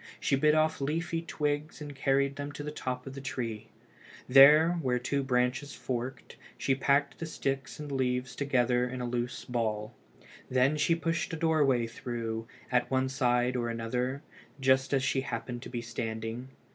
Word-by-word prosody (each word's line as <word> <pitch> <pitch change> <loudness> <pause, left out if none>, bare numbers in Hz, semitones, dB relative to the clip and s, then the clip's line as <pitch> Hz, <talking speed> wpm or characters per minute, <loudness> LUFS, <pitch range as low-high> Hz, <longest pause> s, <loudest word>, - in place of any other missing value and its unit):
She - - +2
bit 150 +3 +4
off 155 -1 +2
leafy 165 +4 -1
twigs 150 -1 -2
and 145 -1 -7
carried 140 0 +1
them 145 0 -5
to 145 - -6
the 150 - -4
top 130 -3 -4
of 135 - -7
the 135 - -7
tree. 115 -5 -4 0.6
There, 150 +5 +8
where 125 -3 +1
two 135 +3 -1
branches 125 +2 0
forked, 125 +1 -5 0.2
she 135 - +1
packed 140 +1 +1
the 165 - -4
sticks 135 -3 -3
and 150 -1 -6
leaves 125 -1 -1
together 125 -3 +1
in 130 0 -5
a 125 - -2
loose 120 0 -3
ball. 110 -3 -2 0.6
Then 130 +3 +3
she 150 +3 +2
pushed 165 0 -2
a - - -2
doorway 150 -7 +3
through, 115 -1 -4 0.2
at 125 0 +2
one 130 0 +1
side 125 -1 +1
or 120 -1 -1
another, 125 +4 -2 0.4
just 130 0 +3
as 135 -2 +2
she 135 -1 +1
happened 120 -1 -5
to - - -8
be 120 -2 -4
standing. 115 +1 -4
130 Hz, 170 wpm, -30 LUFS, 125-145 Hz, 0.6 s, There